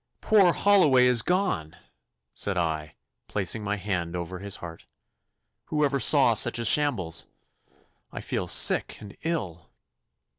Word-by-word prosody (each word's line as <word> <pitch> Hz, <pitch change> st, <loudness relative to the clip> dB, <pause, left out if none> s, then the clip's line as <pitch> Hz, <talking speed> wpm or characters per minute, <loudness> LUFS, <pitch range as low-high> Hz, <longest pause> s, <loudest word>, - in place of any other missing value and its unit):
'Poor 200 Hz, -5 st, +3 dB
Holloway 165 Hz, -11 st, +3 dB
is 125 Hz, -2 st, +3 dB
gone,' 180 Hz, -, -2 dB, 0.6 s
said 100 Hz, -2 st, -2 dB
I, 80 Hz, -3 st, -3 dB, 0.3 s
placing 105 Hz, +2 st, -3 dB
my 105 Hz, 0 st, -2 dB
hand 90 Hz, -4 st, -4 dB
over 90 Hz, +1 st, -6 dB
his 100 Hz, 0 st, -6 dB
heart. 85 Hz, -1 st, -11 dB, 0.8 s
'Who 150 Hz, -1 st, 0 dB
ever 140 Hz, -1 st, -1 dB
saw 135 Hz, -4 st, +4 dB
such 120 Hz, +3 st, +3 dB
a 115 Hz, -, -3 dB
shambles? 115 Hz, -, +1 dB, 0.8 s
I -, -, -7 dB
feel -, -, -4 dB
sick -, -, +2 dB
and 105 Hz, -2 st, -12 dB
ill. 95 Hz, -, -5 dB
105 Hz, 135 wpm, -25 LUFS, 85-145 Hz, 0.8 s, saw